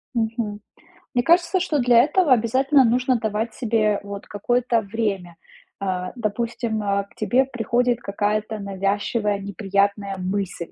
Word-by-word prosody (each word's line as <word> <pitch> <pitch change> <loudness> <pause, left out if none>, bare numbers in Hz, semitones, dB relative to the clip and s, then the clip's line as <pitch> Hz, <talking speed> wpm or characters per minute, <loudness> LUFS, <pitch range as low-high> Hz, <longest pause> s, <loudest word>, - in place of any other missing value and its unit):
Мгм. 220 -2 -2 0.5
Мне 245 -1 +2
кажется, 345 +2 +3
что 320 -4 0
для 240 -1 +5
этого 315 +1 +2
обязательно 260 +4 +4
нужно 250 +2 +2
давать 220 +1 -2
себе 215 -3 +1
вот 200 0 -7
какое-то 240 +3 0
время. 200 -5 -3 0.4
А, 185 -2 -3
допустим, 230 0 -2
а, 200 0 0
к 200 - -22
тебе 235 +3 +2
приходит 245 -1 0
какая-то 210 +1 -2
навязчивая, 200 +2 -1
неприятная 200 0 -1
мысль. 185 -2 -3
220 Hz, 130 wpm, -23 LUFS, 200-245 Hz, 0.5 s, для